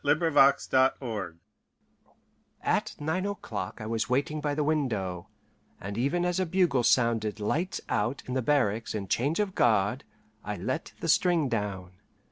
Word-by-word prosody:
LA 145 +1 +4
JONGLEUSE 135 - +2 1.3
At - - 0
nine 160 +6 -1
o'clock 110 - -5
I 110 - -6
was 115 +1 -2
waiting 145 +4 0
by 145 -1 -1
the 150 - 0
window, 110 - -1 0.5
and 100 +1 -6
even 140 +10 0
as 180 +1 0
a 185 - +1
bugle 175 -7 +2
sounded 115 -3 +2
"lights 165 - -1
out" 120 +6 -1
in 125 - -5
the 130 - +1
barracks 115 -6 +1
and 100 -2 -4
change 140 - 0
of 205 -3 0
guard, 110 - +2 0.4
I 105 - -4
let 130 - -4
the - - -3
string 170 -3 +3
down. 100 -5 -3
130 Hz, 150 wpm, -28 LUFS, 105-155 Hz, 1.3 s, LA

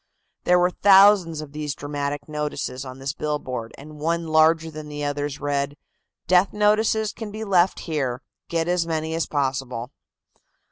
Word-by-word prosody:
There 180 - +5
were 180 0 +3
thousands 195 -5 +5
of 150 -2 -9
these 150 -1 -4
dramatic 145 0 -4
notices 150 -3 -4
on 130 0 -8
this 135 +1 -4
billboard, 130 -7 -4
and 150 +2 -12
one 165 +2 -1
larger 160 +1 +3
than 155 0 -8
the 150 0 -5
others 145 0 -3
read: 145 0 -1 0.5
"Death 185 +1 +3
notices 215 0 +2
can 225 -2 -7
be 215 +2 -6
left 185 -3 +2
here; 135 -6 -2 0.3
get 165 -1 0
as 175 -1 +1
many 160 -1 -2
as 165 0 -1
possible." 130 -3 -2
155 Hz, 155 wpm, -23 LUFS, 145-175 Hz, 0.5 s, There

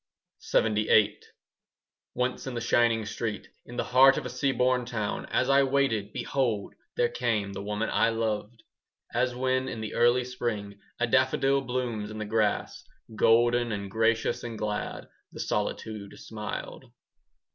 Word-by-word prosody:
LXXVIII 105 -1 +3 1.0
Once 125 +1 -1
in 130 - -4
the - - -1
shining 115 -1 +2
street, 105 0 -4 0.2
In 120 - -9
the - - +1
heart 135 +2 +6
of - - -3
a 125 - -4
seaboard 125 -1 +1
town, 110 -4 -3
As 130 - +1
I 140 +1 +5
waited, 130 -7 +1
behold, 115 -7 -1 0.2
there 120 - +3
came 115 -5 -1
The 100 - -5
woman 105 +2 -2
I 115 - +3
loved. 115 0 -3 0.5
As 125 +1 +1
when, 130 +1 0
in 115 - -5
the 110 -1 -5
early 120 +1 +4
spring, 105 -5 -4 0.2
5 120 - +1
A - - -10
daffodil 135 +1 +3
blooms 125 -5 -3
in 110 - -7
the 110 - -3
grass, 105 -1 0 0.3
Golden 120 +2 +3
and 100 -2 -4
gracious 115 +2 +1
and 115 -2 -5
glad, 105 -1 -3 0.3
The - - -9
solitude 105 -3 -3
smiled. 110 -1 -6
115 Hz, 150 wpm, -28 LUFS, 105-125 Hz, 1.0 s, heart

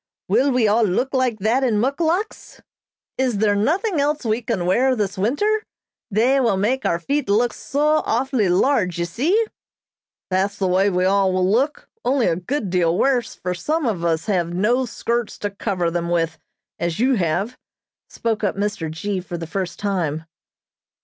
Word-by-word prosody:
Will 275 - +3
we 250 -4 +3
all 215 +3 +3
look 220 +8 0
like 255 -4 +1
that 235 +6 +2
in 240 -4 +2
muckluks? 320 - -1 0.6
Is 255 -5 +1
there 205 0 +2
nothing 325 - +1
else 295 -1 0
we 220 +2 0
can 220 -7 -2
wear 255 +8 +3
this 205 -4 -2
winter? 410 - +1 0.5
They 240 +6 +3
will 230 -7 +2
make 245 +7 0
our 170 - +1
feet 280 - -2
look 230 +3 +2
so 300 +2 +1
awfully 245 -4 +1
large, 185 -2 +2
you 170 - 0
see?" 325 - +1 0.9
"That's 195 +2 0
the 195 - -1
way 190 +2 +3
we 180 -1 0
will 190 - +3
all 190 -2 +2
look, 260 +9 0 0.2
only 260 -2 +2
a 165 - +2
good 200 - -3
deal 175 -2 +2
worse, 250 -3 +1
for 180 0 -3
some 300 - -1
of 200 -8 -1
us 165 -1 0
have 180 -5 0
no 240 +7 +1
skirts 235 0 -2
to 205 - -3
cover 190 -4 -2
them 170 0 -2
with, 165 -2 0 0.4
as 170 +1 -2
you 260 +3 +3
have," 190 +7 -1 0.5
spoke 225 -2 -2
up 205 - 0
Mr. 200 -5 -2
G. 190 +5 -3
for 175 -1 -6
the 165 - -5
first 180 +2 -4
time. 170 -7 -2
210 Hz, 175 wpm, -21 LUFS, 185-260 Hz, 0.9 s, Will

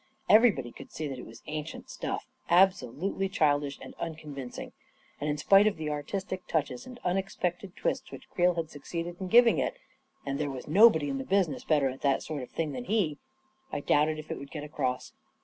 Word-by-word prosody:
Everybody 210 - +5
could - - -12
see 155 - -4
that 135 -3 -5
it - - -9
was 115 - -13
ancient 155 +1 -5
stuff, - - -4 0.2
absolutely 185 +1 +2
childish 145 -5 +1
and - - -10
uncon 155 -3 -5
vincing, 130 -3 -7 0.5
and 150 - -2
in 150 - 0
spite 195 +7 +6
of 215 - 0
the 155 -1 -3
artistic 185 +5 -4
touches 140 -6 -1
and 250 -1 -10
un 180 +1 +1
expected 185 -1 -3
twists 265 0 -2
which - - -10
Creel 180 0 +3
had 165 -2 -3
succeeded 170 +4 -5
in 190 - -4
giv 240 +5 +7
ing 230 - +3
it - - -1 0.2
— - - -38
and 140 0 -2
there 150 -1 -1
was 130 -2 -7
nobody 160 -2 +6
in 135 -1 -2
the - - -3
business 180 -4 +1
better 145 -4 +3
at 130 0 -5
that 140 -1 +2
sort 150 -3 -4
of 125 - -8
thing 160 -2 -2
than 245 - -5
he 190 -10 0 0.3
— 265 0 -38
I - - -2
doubted 150 +2 +2
if 155 - -8
it - - -3
would 140 - -9
get 150 0 -6
across. 130 -4 -3
155 Hz, 220 wpm, -29 LUFS, 145-190 Hz, 0.5 s, giv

